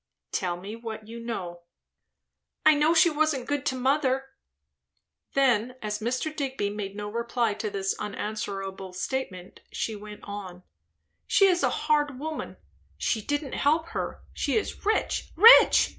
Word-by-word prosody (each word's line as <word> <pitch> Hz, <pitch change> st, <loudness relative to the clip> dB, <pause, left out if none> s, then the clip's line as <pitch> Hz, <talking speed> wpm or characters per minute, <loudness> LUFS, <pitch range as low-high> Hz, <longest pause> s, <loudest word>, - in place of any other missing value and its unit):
"Tell 175 Hz, -2 st, -1 dB
me 200 Hz, +5 st, -7 dB
what 220 Hz, -2 st, -7 dB
you 230 Hz, +1 st, -8 dB
know." 185 Hz, -7 st, -5 dB, 1.0 s
"I 310 Hz, -, +8 dB
know 305 Hz, +3 st, +3 dB
she 335 Hz, +1 st, +6 dB
wasn't 300 Hz, -4 st, 0 dB
good 290 Hz, -2 st, -1 dB
to 260 Hz, -, 0 dB
mother." 270 Hz, 0 st, +1 dB, 1.1 s
Then, 250 Hz, -3 st, +2 dB
as 210 Hz, -2 st, -3 dB
Mr. 255 Hz, +7 st, -2 dB
Digby 265 Hz, -8 st, -2 dB
made 200 Hz, -1 st, -5 dB
no 205 Hz, 0 st, -5 dB
reply 235 Hz, 0 st, -1 dB
to 210 Hz, +1 st, -4 dB
this 195 Hz, -1 st, -1 dB
unanswerable 195 Hz, -2 st, -5 dB
statement, 185 Hz, -2 st, -4 dB
she 220 Hz, -, -3 dB
went 210 Hz, 0 st, -10 dB
on; 190 Hz, -3 st, -8 dB, 0.6 s
"She 395 Hz, -, +5 dB
is 365 Hz, -2 st, +3 dB
a -, -, +3 dB, 0.2 s
hard 295 Hz, -3 st, +2 dB
woman; 315 Hz, +2 st, -5 dB, 0.4 s
she 220 Hz, -, 0 dB
didn't 290 Hz, +4 st, -3 dB
help 320 Hz, +3 st, +1 dB
her. -, -, -4 dB
She -, -, 0 dB
is 435 Hz, -, -3 dB
rich, 435 Hz, -, 0 dB
rich! 445 Hz, +8 st, +8 dB
235 Hz, 145 wpm, -27 LUFS, 205-290 Hz, 1.1 s, I